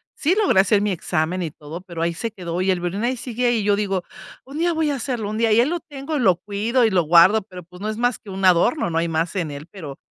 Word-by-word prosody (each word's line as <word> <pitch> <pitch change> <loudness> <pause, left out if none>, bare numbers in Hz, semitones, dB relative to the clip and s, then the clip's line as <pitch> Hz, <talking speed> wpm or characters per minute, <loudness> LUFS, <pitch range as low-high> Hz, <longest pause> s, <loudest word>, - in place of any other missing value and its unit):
sí 335 +6 +1
logré 410 - +3
hacer 200 +1 +2
mi 210 - 0
examen 175 0 -1
y 165 -4 -3
todo, 155 +4 -9
pero 170 -3 -7
ahí 170 0 0
se 230 +6 -4
quedó 180 -3 -4
y 190 - 0
el 180 - 0
violín 180 +5 -3
ahí 250 +1 0
sigue 245 +1 -2
ahí, 240 -1 +2
y - - -2
yo 205 0 +3
digo, 195 -3 -1 0.4
un 280 +4 -7
día 345 +1 +2
voy 315 -2 0
a 280 - -1
hacerlo, 240 -5 -3
un 215 - -4
día, 225 -1 +2
y 220 - +5
ahí 245 - +4
lo 345 +2 -2
tengo, 290 +1 -5
lo 190 -8 +4
cuido 220 +5 0
y - - +3
lo 180 -3 +3
guardo, 175 +7 +6
pero, 185 -3 -11
pues, 180 +3 -15
no 215 - -2
es 215 - -4
más 245 0 +1
que 205 - -14
un 190 0 -3
adorno, 185 - +3
no 165 - -2
hay 170 - 0
más 165 +4 -1
en 165 -6 -2
él. 145 +3 -8
Pero, 150 -9 -9
200 Hz, 295 wpm, -22 LUFS, 175-240 Hz, 0.4 s, guardo